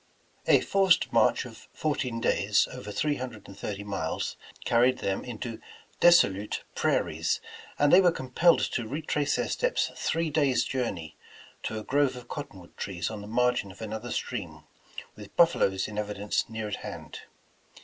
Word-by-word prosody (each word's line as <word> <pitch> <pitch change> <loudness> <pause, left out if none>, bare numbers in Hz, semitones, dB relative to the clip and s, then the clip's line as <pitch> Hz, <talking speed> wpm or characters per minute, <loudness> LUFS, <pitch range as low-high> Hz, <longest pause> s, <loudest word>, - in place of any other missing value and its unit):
A - - +6
forced 195 -3 +3
march - - +3
of - - -12
fourteen 140 -6 -1
days, - - +2
over 105 - -7
three 145 +7 0
hun 130 0 -4
dred 110 -4 -13
and 100 - -11
thirty 100 0 -5
miles, 95 -6 -3 0.3
carried 125 +2 +4
them 95 -1 -2
into 115 -1 -6 0.4
desolute 105 - +4
prai - - +2
ries, - - -1 0.4
and 145 0 +4
they 185 - +9
were 180 -2 +5
compelled 165 +5 +3
to 120 -3 -1
retrace 145 +1 -1
their - - 0
steps - - 0
three 165 -1 -1
days' 140 -4 +3
journey, 85 - -3 0.4
to 110 - -4
a 110 - -5
grove 140 0 +2
of 125 -1 -10
cottonwood 95 - -8
trees 90 0 -3
on 105 -2 -6
the 100 - -9
margin 125 -3 +1
of 95 - -16
another 110 +2 -5
stream, - - -4 0.5
with - - -12
buffaloes 95 0 +3
in 105 - -8
evi 105 -1 -2
dence 105 +1 -1
near 110 -1 -4
at 105 - -3
hand. - - -8
115 Hz, 170 wpm, -28 LUFS, 105-145 Hz, 0.5 s, they